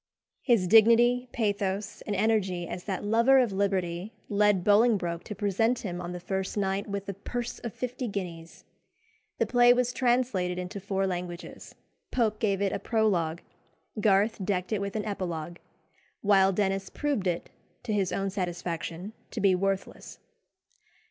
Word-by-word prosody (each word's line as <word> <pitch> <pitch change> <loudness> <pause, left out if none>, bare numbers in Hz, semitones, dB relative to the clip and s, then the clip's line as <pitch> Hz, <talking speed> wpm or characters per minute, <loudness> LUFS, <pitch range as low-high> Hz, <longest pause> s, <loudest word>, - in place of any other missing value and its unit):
His 235 -8 +3
dignity, 235 +5 +5
pathos, 205 -2 -2
and 205 - -1
energy 190 -4 +1
as 180 - -6
that 190 -3 -3
lover 230 +6 +4
of 250 -5 +3
liberty 190 0 -1 0.2
led 205 -2 +3
Bolingbroke 205 -5 +3
to 210 - -6
present 215 +4 +1
him 175 -2 -4
on 175 0 -5
the 180 - -5
first 190 +3 -3
night 195 0 -1
with 200 0 -4
a 200 - -3
purse 240 +5 -5
of 235 - -5
fifty 250 +2 -4
guineas. 175 -5 -6 0.7
The - - +2
play 245 0 +5
was 245 0 0
translated 240 -8 +1
into 180 +2 -5
four 195 0 -1
languages; 175 -2 -6 0.3
Pope 215 -4 0
gave 200 -3 +1
it 195 - 0
a - - -2
prologue; 180 -8 0 0.6
Garth 205 0 +2
decked 185 0 -1
it 205 - 0
with 200 +1 -4
an 210 - -2
epilogue; 175 -5 -4 0.6
while 195 -2 +4
Denis 195 0 -1
proved 285 -10 -1
it, 175 -1 -2 0.3
to 230 -3 -2
his 195 -3 +1
own 195 0 -1
satisfaction, 175 0 -4 0.2
to 225 - -5
be 195 -2 +4
worthless. 195 +1 -2
200 Hz, 155 wpm, -28 LUFS, 185-220 Hz, 0.7 s, dignity